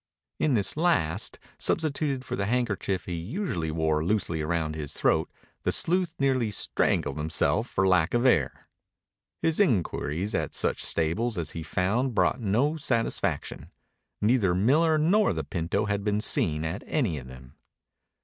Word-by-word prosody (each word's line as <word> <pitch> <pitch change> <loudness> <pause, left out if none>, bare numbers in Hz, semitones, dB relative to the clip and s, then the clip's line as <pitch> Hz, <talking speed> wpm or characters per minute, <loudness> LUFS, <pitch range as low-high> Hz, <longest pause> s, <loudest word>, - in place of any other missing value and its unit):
In 145 -5 +2
this 100 -3 +1
last, 155 - +1 0.2
substituted 145 -4 0
for - - -3
the 100 - -2
handkerchief 105 -6 -1
he 90 - -4
usually 90 - -3
wore 80 -1 0
loosely 85 -4 0
round 80 0 -1
his 75 -2 -5
throat, - - +1 0.3
the - - 0
sleuth 175 -1 +1
nearly 130 -5 +1
strangled 75 -7 0
himself 80 +9 +1
for 95 0 +1
lack 90 +1 +3
of 120 +2 +2
air. 80 - +2 0.8
His 165 +2 +1
inquiries 100 - 0
at - - -2
such - - 0
stables 100 +8 -1
as 80 -3 -2
he 80 - -6
found 105 +9 0
brought 120 +4 +2
no 120 +10 +1
satisfaction. 120 -6 -1 0.5
Neither 105 -5 +3
Miller 155 - +3
nor 185 - +3
the 80 -2 -3
pinto 85 +7 -2
had 100 -1 -1
been 105 0 +1
seen 80 -6 0
at 90 +7 -3
any 110 - 0
of 65 - -11
them. 65 0 -13
100 Hz, 150 wpm, -27 LUFS, 80-130 Hz, 0.8 s, lack